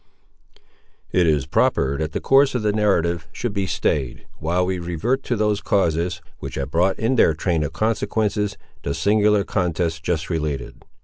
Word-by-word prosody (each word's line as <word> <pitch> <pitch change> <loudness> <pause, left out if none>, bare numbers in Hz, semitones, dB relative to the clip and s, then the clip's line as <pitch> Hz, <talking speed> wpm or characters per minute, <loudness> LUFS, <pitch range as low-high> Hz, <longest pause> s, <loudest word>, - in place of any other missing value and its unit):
It 90 -2 +3
is 75 -4 +2
proper 70 +1 +1
that 80 0 -2
the - - -2
course 135 0 +4
of 120 - -1
the 105 -1 +1
narrative 85 -6 +1
should 120 +3 -4
be 100 -2 -1
stayed, 70 -7 -1
while 90 +3 +1
we 95 0 -2
revert 90 - -1
to 120 - 0
those 105 -1 +1
causes, 85 -4 0 0.2
which - - -6
have 70 0 -4
brought 90 +4 +2
in 120 +3 0
their 80 - +4
train 85 -1 0
of 75 - -3
consequences, 105 -1 0 0.2
the 70 - -3
singular 105 0 +3
contest 85 -4 -1
just 80 -1 -1
related. 75 -6 -3
90 Hz, 170 wpm, -22 LUFS, 80-105 Hz, 0.2 s, course